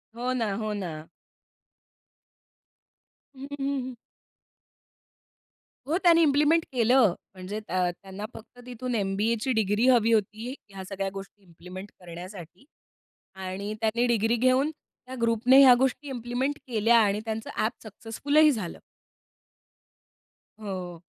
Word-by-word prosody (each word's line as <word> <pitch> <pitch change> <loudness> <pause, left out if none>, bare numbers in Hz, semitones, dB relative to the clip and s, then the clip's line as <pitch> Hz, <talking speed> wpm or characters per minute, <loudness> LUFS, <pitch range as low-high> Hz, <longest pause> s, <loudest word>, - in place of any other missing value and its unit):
हो 245 +2 -2
ना, 230 -5 -1
हो 215 0 -3
ना. 165 -6 -6 2.3
हं, 265 +1 -8
हं, 275 - -2 0.2
हं. 255 -1 -7 1.9
हो, 320 +4 +1
त्यांनी 335 -2 +6
इम्प्लिमेंट 300 +2 +3
केलं. 240 -4 +4 0.2
म्हणजे 190 +3 -6
त्य 185 -4 -1
त्यांना 195 +2 -7
फक्त 240 +2 -14
तिथून 250 0 -4
एम-बी-एची 215 +4 0
डिग्री 220 +2 +1
हवी 235 -3 +4
होती. 220 +3 -1 0.2
ह्या 195 -1 -8
सगळ्या 195 -1 -3
गोष्टी 195 +1 -10
इम्प्लिमेंट 180 +3 -11
करण्यासाठी 180 - -10 0.7
आणि 190 +2 -5
त्यांनी 225 +2 +1
डिग्री 230 0 +2
घेऊन 255 +5 +2
त्या 260 -4 -14
ग्रुपने 230 +3 +4
ह्या 255 -2 +9
गोष्टी 265 +2 0
इम्प्लिमेंट 250 +3 -2
केल्या 230 -1 +3
आणि 205 -2 +2
त्यांचं 220 0 -4 0.2
ऍप 220 - 0
सक्सेसफुलही 280 +8 +2
झालं. 210 -10 -5 1.8
हो. 180 -5 -6
220 Hz, 115 wpm, -27 LUFS, 195-255 Hz, 2.3 s, ह्या